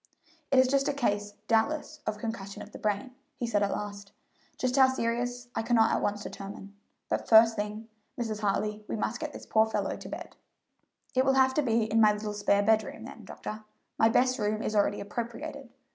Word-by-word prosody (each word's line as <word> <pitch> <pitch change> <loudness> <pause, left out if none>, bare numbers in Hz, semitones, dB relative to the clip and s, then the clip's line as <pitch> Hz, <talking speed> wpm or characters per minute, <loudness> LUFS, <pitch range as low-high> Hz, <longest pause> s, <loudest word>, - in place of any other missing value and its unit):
"It 270 - +3 0.2
is 275 0 +3
a - - +1
case, 205 -6 -1
doubtless, 295 +7 +1
of 215 0 -1
concussion 210 -3 -5
of 205 - -13
the - - -10
brain," 215 +5 -2 0.2
he 240 - -2
said 210 -3 +1
at 200 - +2
last; 200 -1 -5 0.5
"just 255 0 0
how 265 -1 +7
serious 245 -1 -2
I - - -1
cannot 225 -1 +3
at - - +1
once 205 0 -1
determine, 195 0 -8 0.3
but, - - -2
first 225 0 +7
thing, 210 +1 -4 0.3
Mrs. 220 -3 -2
Hartley, 210 +1 -1
we - - -3
must 215 +1 -2
get 310 -2 -4
this - - -10
poor 220 0 +3
fellow 220 - -1
to - - -9
bed." - - -8 0.8
"It 260 - +3
will 270 0 +3
have 260 0 +4
to 300 - +2
be 230 -4 +2
in 220 +1 +2
my 210 -1 +6
little 210 0 -4
spare 205 -1 +2
bedroom, 220 +1 +1
then, - - -10
doctor; 215 0 -7 0.4
my 225 - +6
best 255 +2 +2
room 215 +1 0
is 215 - -2
already 205 0 +2
appropriated. 235 +6 -6
220 Hz, 200 wpm, -29 LUFS, 210-245 Hz, 0.8 s, how